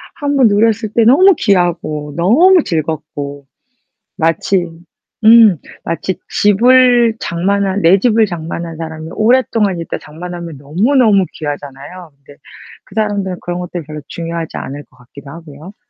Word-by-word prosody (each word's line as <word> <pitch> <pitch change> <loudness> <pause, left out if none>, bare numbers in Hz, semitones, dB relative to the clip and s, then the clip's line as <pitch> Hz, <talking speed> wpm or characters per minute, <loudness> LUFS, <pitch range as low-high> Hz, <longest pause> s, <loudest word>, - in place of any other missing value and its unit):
한번 285 -5 +2
누렸을 215 +1 +1
때 235 - +3
너무 370 - +6
귀하고 165 -7 -1
너무 325 - +4
즐겁고 150 -3 -5 0.7
마치 175 +2 0 0.6
음 220 -4 +7 0.3
마치 175 +2 -3 0.2
집을 240 +2 +4
장만한 195 +3 -1
내 170 +4 +5
집을 225 +1 +2
장만한 170 -2 -6
사람이 160 0 -7
오랫동안 215 -5 +1
있다 165 - -5
장만하면 170 0 -9
너무너무 200 - +2
귀하잖아요. 145 +3 -8
근데 140 +1 -19 0.5
그 - - -18
사람들은 205 -4 -2
그런 175 0 -5
것들이 175 -2 -6
별로 150 0 -9
중요하지 165 -1 -6
않을 145 +2 -7
것 130 - -28
같기도 140 +3 -14
하고요. 160 +3 -12
180 Hz, 305 characters per minute, -15 LUFS, 160-220 Hz, 0.7 s, 음